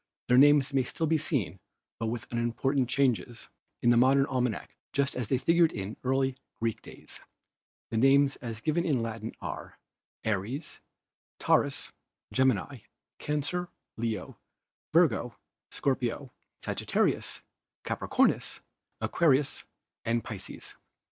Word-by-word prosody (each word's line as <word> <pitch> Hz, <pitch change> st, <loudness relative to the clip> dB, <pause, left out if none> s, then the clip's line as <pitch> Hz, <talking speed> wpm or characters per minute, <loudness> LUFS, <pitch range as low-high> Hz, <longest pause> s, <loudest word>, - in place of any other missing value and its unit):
Their 125 Hz, +1 st, +7 dB
names 145 Hz, 0 st, +6 dB
may 135 Hz, -, +4 dB
still 145 Hz, +6 st, -1 dB
be 160 Hz, 0 st, +2 dB
seen, 110 Hz, -, -1 dB, 0.4 s
with 115 Hz, 0 st, -3 dB
but -, -, -28 dB
unimportant 125 Hz, +2 st, 0 dB
changes, 125 Hz, -3 st, 0 dB, 0.3 s
in 120 Hz, 0 st, +6 dB
a -, -, +3 dB
modern 135 Hz, +3 st, +5 dB
almanac 125 Hz, -, -2 dB, 0.2 s
just 140 Hz, 0 st, +1 dB
as 125 Hz, -4 st, -2 dB
they 130 Hz, -, +2 dB
figured 165 Hz, +4 st, +4 dB
in 100 Hz, +1 st, -5 dB
early 135 Hz, 0 st, +1 dB, 0.2 s
Greek 115 Hz, -1 st, -1 dB
days. -, -, -12 dB, 0.7 s
The 115 Hz, -, -1 dB
names 135 Hz, +3 st, +5 dB
as 115 Hz, -2 st, -6 dB
given 160 Hz, +4 st, +1 dB
in 140 Hz, -9 st, +1 dB
Latin 110 Hz, -1 st, -5 dB
are -, -, -6 dB, 0.5 s
Aries, 110 Hz, -, -3 dB, 0.6 s
Tau -, -, +4 dB
rus, -, -, -3 dB, 0.4 s
Gemini, 130 Hz, 0 st, +2 dB, 0.4 s
Cancer, 150 Hz, +4 st, -2 dB, 0.3 s
Leo, 110 Hz, -4 st, -4 dB, 0.5 s
Virgo, -, -, +3 dB, 0.3 s
Scorpio, 130 Hz, 0 st, -2 dB, 0.3 s
Sagittarius, -, -, 0 dB, 0.4 s
Capricornus, -, -, +1 dB, 0.4 s
Aquarius 145 Hz, -4 st, +2 dB, 0.4 s
and 115 Hz, 0 st, 0 dB
Pisces. 100 Hz, -4 st, -8 dB
130 Hz, 120 wpm, -29 LUFS, 115-140 Hz, 0.7 s, Their